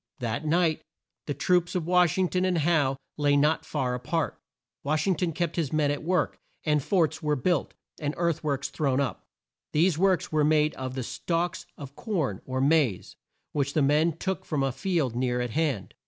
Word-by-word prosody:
That 120 +1 -3
night 165 0 +2 0.5
the 145 - -2
troops 175 +4 +1
of 175 -3 -1
Wash 180 -1 +3
ing 185 -1 +3
ton 180 +1 0
and 185 -2 +1
Howe 145 -4 +2 0.2
lay 145 -1 +3
not 150 +3 +2
far 125 -2 -1
a 125 - -2
part. 160 +6 -2 0.4
Wash 155 +2 0
ing 195 - +3
ton 165 +1 -1
kept 170 +1 -2
his 160 -6 0
men 150 -2 +2
at 145 - -3
work, 180 +2 0 0.2
and 150 -2 +2
forts 165 -1 +1
were 150 -1 +1
built, 150 +4 0 0.2
and 150 0 -2
earth 170 -2 0
works 140 -2 -1
thrown 135 -3 0
up. 140 -2 -3 0.5
These 165 +1 +3
works 190 -2 +2
were 155 -1 +2
made 150 0 +3
of 130 -1 -5
the 130 - -2
stalks 170 +7 -2
of 140 -1 -9
corn, 160 - -2
or 130 0 -2
maize, 140 - +2 0.4
which 140 -1 -1
the 155 - +2
men 150 +3 +2
took 190 +1 -2
from 145 -4 -1
a 135 - +1
field 155 - -1
near 125 0 0
at 125 -1 -2
hand. 140 - -1
150 Hz, 200 wpm, -27 LUFS, 140-170 Hz, 0.5 s, Wash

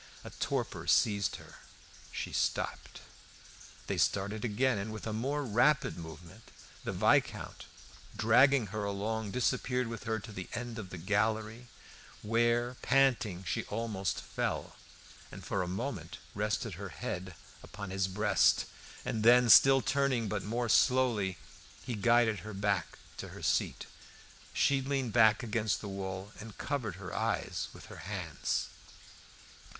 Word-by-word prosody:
A - - -9
torpor - - -3
seized 100 -2 +3
her; - - -12 0.5
she - - -5
stopped. - - -2 0.8
They - - -2
started 100 +2 0
again, 120 +1 +1
and 105 +2 -4
with 110 - -7
a 110 - -3
more 140 +7 -1
rapid 125 +3 +2
movement; 80 0 -11 0.3
the - - -2
Viscount, - - +1 0.5
dragging 125 +3 +5
her 105 -1 -2
along 105 +2 -2
disappeared 125 +1 0
with 115 -1 -7
her 110 -1 0
to 110 +1 -9
the 95 -3 -7
end 120 -1 -5
of 95 -4 -7
the 95 - -7
gallery, 110 +5 -1 0.6
where 120 +2 +1
panting, 120 -8 +2
she 85 -2 -2
almost 105 -3 -2
fell, - - -3 0.6
and - - -10
for 95 - -1
a 90 - -2
moment 95 - -4 0.2
rested 105 +1 -1
her 100 - -5
head 95 -4 -5 0.3
upon 100 -1 -8
his 95 0 0
breast. 105 +1 +3 0.4
And 110 - -2
then, 120 +1 +6
still 135 +3 +8
turning, 135 -4 +1
but 105 0 -2
more 120 +4 -2
slowly, 115 -6 +3 0.5
he 125 - -3
guided 115 0 +3
her 110 -1 -8
back 100 -3 -1 0.2
to - - -6
her - - -10
seat. - - 0 0.7
She 140 -1 +2
leaned 135 -4 -2
back 110 -1 +5
against 110 -2 0
the 105 - -7
wall 95 0 -5
and 110 -1 -10
covered 125 - -3
her 95 -1 -7
eyes - - -1
with - - -12
her - - -11
hands. - - -2
110 Hz, 145 wpm, -32 LUFS, 100-120 Hz, 0.8 s, still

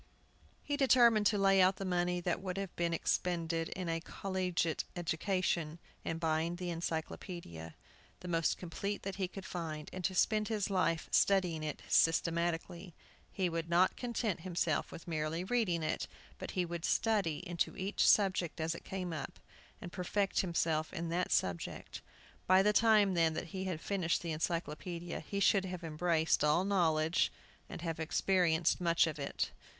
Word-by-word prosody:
He 290 -1 -2
determined 240 -6 +5
to 210 - +2
lay 195 -1 +5
out 185 +1 +5
the 195 - -5
money 180 -1 0
that 175 +1 -1
would 185 -1 -4
have 195 -2 -4
been 170 -1 0
expended 165 -1 -1
in 185 -2 -5
a 165 0 -1
collegiate 180 -3 -1
education 170 -1 -1 0.3
in 165 - -2
buying 165 0 0
an 175 -2 -3
Encyclopædia, 160 - -5 0.5
the 180 - -8
most 165 -2 +1
complete 200 +4 -4
that 195 -1 -4
he 190 -2 -1
could 190 +1 -9
find, 155 -3 -5
and 185 - -6
to 190 - 0
spend 215 +2 +2
his 210 -3 -1
life 175 -3 +1
studying 180 -5 +3
it 155 -1 -5
systematically. 170 +1 +1 0.4
He 190 -2 0
would 165 -1 -3
not 175 +2 +4
content 235 -6 -2
himself 170 -2 -1
with 165 - -10
merely 160 +1 -2
reading 190 -6 0
it, 155 - -2 0.3
but - - -6
he 180 - +2
would 170 -1 -5
study 200 -10 +1
into 175 -1 -2
each 195 +2 +1
subject 185 -5 +3
as 160 +1 0
it - - -9
came 180 -3 -4
up, 155 - -6 0.4
and 175 - -8
perfect 195 +2 0
himself 165 -3 0
in 165 0 -4
that 175 +2 -1
subject. 90 -2 -2 0.5
By 185 +1 +6
the 210 +1 +3
time, 210 -3 +5
then, 165 -2 +2
that 170 - -4
he 190 +2 -4
had 180 -4 -3
finished 180 -3 -1
the 170 - -3
Encyclopædia 170 +1 -3
he 200 +6 -4
should 195 0 +4
have 180 -2 -6
embraced 160 0 +1
all 150 +5 +3
knowledge, 165 -4 +2 0.4
and 170 - -7
have 165 -2 -3
experienced 170 +1 +2
much 170 -1 +4
of 155 -2 -4
it. 140 - -2
175 Hz, 165 wpm, -34 LUFS, 165-190 Hz, 0.5 s, By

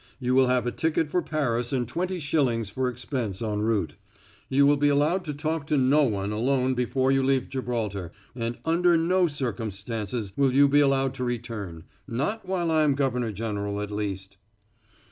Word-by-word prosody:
You 125 -1 0
will 130 0 +5
have 125 -1 +1
a 120 - 0
ticket 160 0 0
for 180 - +2
Paris 125 -7 -1
and 125 -3 0
twenty 180 +8 -2
shillings 130 - 0
for 130 +3 -1
expense 120 -5 -4
en 105 -2 -2
route. 110 -1 0 0.6
You 140 +1 +4
will 145 +1 +5
be 145 +1 +3
allowed 150 +6 +2
to 150 - -3
talk 155 0 -2
to 150 - +1
no 135 +3 +4
one 100 -4 -1
alone 130 +4 +1
before 130 +1 +1
you 135 0 +3
leave 135 -1 +1
Gibraltar, 110 -9 -3 0.2
and 120 -1 -3
under 170 +1 +3
no 180 +2 +2
circumstances 110 - -4
will 135 -2 +2
you 140 +1 +6
be 145 +1 +4
allowed 135 -2 +2
to 125 - -4
return 110 -9 -4 0.2
not 155 - -2
while 175 -3 0
I 160 -1 +3
am 145 -3 +3
governor 125 -4 0
general, 105 -1 -3
at 105 0 -4
least." 95 -2 -4
130 Hz, 185 wpm, -26 LUFS, 110-145 Hz, 0.6 s, you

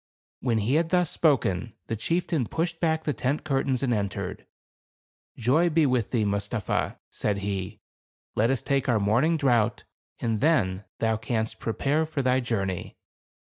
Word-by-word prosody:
When 120 -3 +1
he 110 +5 0
had 165 - -5
thus 180 -2 +2
spoken, 115 - +1
the 115 - -2
chieftain 165 +1 0
pushed 165 0 -2
back 160 -1 +1
the 150 - 0
tent 130 +5 -1
curtains 135 -3 0
and 125 -3 +2
entered. 100 -4 -3 0.9
"Joy 145 +10 +3
be 160 -1 +3
with 125 -5 +1
thee, 115 -4 +1
Mustapha," 100 +1 -1
said 105 -2 -1
he. 100 +1 -4 0.5
"Let 115 +3 +3
us 135 -2 0
take 140 -1 0
our 115 -3 +3
morning 120 +11 +3
draught, 120 -6 +2 0.3
and 115 -2 0
then 105 - +2
thou 110 -1 +1
canst 110 0 -2
pre 115 - -2
pare 150 +6 +1
for 150 -3 -2
thy 130 0 +3
journey." 100 -7 -2
125 Hz, 160 wpm, -26 LUFS, 110-150 Hz, 0.9 s, Joy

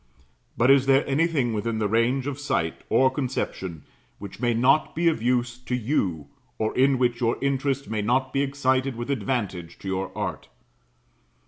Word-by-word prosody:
But 120 +3 +5
is 135 -1 +4
there 135 +1 +4
anything 140 -4 +1
within 110 +1 -2
range 115 +5 +1
of 145 -1 -4
sight, 85 - -1
or 130 0 +4
conception, 120 - -4 0.3
which 100 -1 -9
may 120 -1 +1
not 135 +6 +3
be 170 +1 +1
of 160 -8 +1
use 120 0 0
to 125 0 -3
you, 105 - -1 0.3
or 110 0 -1
in 135 +1 +4
which 120 -1 0
your 115 0 +1
interest 140 0 -1
may 110 -1 -2
not 130 +5 0
be 135 - +1
excited 135 -1 0
with 120 +4 -4
advantage 100 -8 -3
to - - -10
your 95 0 -2
art? - - -4
125 Hz, 165 wpm, -25 LUFS, 110-135 Hz, 0.3 s, But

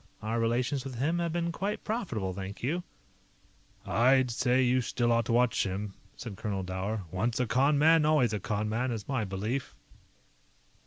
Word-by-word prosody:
Our 115 +2 -1
relations 125 +4 0
with 135 -2 -6
him 155 +8 0
have 170 -1 -1
been 170 0 -1
quite 200 +5 -3
profitable, 120 - -2
thank 95 +3 -7
you." 165 +8 0 1.0
"I'd 130 +2 +3
say 125 +2 +2
you 125 +1 +3
still 120 0 0
ought 115 -1 +2
to - - -2
watch 120 0 +3
him," 100 +1 -3 0.2
said 110 -6 -7
Colonel 100 -2 -3
Dower. 95 +3 -3
"Once 115 +6 -1
a 125 - +2
con 135 +6 +3
man, 160 +2 +5
always 150 -7 +3
a 105 - -1
con 105 +2 -2
man, 120 +4 -1
is 110 -4 -4
my 130 -6 -1
belief." 105 +7 -3
120 Hz, 175 wpm, -29 LUFS, 105-135 Hz, 1.0 s, man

